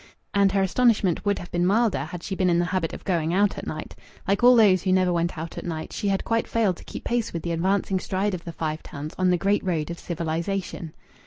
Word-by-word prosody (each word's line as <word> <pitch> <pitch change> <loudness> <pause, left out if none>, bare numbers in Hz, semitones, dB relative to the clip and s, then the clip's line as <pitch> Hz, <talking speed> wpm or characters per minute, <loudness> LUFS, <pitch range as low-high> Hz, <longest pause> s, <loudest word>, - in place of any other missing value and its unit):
And 200 -1 +4
her 195 -1 +3
astonishment 205 -3 +2
would 200 -1 +2
have 175 - -9
been 175 0 0
milder 215 +3 +2
had 175 -1 -8
she 195 - -4
had - - -6
been 185 -1 +3
in 170 - +3
the 175 - +2
habit 180 -2 -1
of - - -8
going 170 -3 0
out 205 +1 +2
at - - -8
night. 155 - -6 0.3
Like 200 +4 +1
all 250 +1 +8
those 200 -6 +5
who 185 - 0
never 185 -1 +3
went 170 0 -1
out 160 +1 -5
at - - -8
night, 160 -2 -5
she 205 - -2
had 195 -1 +1
quite 230 0 0
failed 210 -6 +1
to - - -13
keep - - -8
pace 240 -2 -1
with 170 - -4
the 170 - -2
advancing 190 +3 +1
stride 195 +2 -1
of 175 -2 -5
the 170 - -6
Five 155 -1 -3
Towns 145 +2 -7
on 185 0 +3
the 180 - +3
great 200 +3 +1
road 170 -4 -1
of 170 - -7
civilization. 170 0 -3
185 Hz, 260 wpm, -25 LUFS, 170-200 Hz, 0.3 s, all